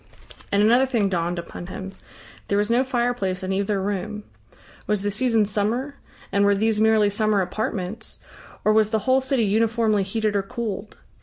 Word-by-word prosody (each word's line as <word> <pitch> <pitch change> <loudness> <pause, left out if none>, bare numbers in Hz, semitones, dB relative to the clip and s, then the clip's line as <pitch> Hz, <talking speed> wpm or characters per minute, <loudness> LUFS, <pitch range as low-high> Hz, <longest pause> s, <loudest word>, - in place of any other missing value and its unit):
And 200 +1 +3
another 245 +5 +5
thing 225 -6 +1
dawned 175 -1 -1
upon 170 +1 -7
him. 190 +1 -7 0.6
There 200 - +1
was 210 +2 +1
no 245 +2 +4
fireplace 240 -8 -1
in 190 +1 -1
either 200 +1 0
room. 205 +2 -3 0.6
Was 210 -2 0
the 205 - 0
season 225 0 +2
summer, 220 +7 -1 0.4
and 200 0 +2
were 200 0 +4
these 215 +1 +1
merely 220 -2 +4
summer 215 0 +1
apartments, 205 +2 -3 0.5
or 215 - +5
was 215 -1 +3
the 220 - +1
whole 260 +1 +4
city 265 -3 +1
uniformly 220 0 +2
heated 210 +2 -1
or 200 - +2
cooled? 210 0 -5
210 Hz, 170 wpm, -23 LUFS, 200-230 Hz, 0.6 s, another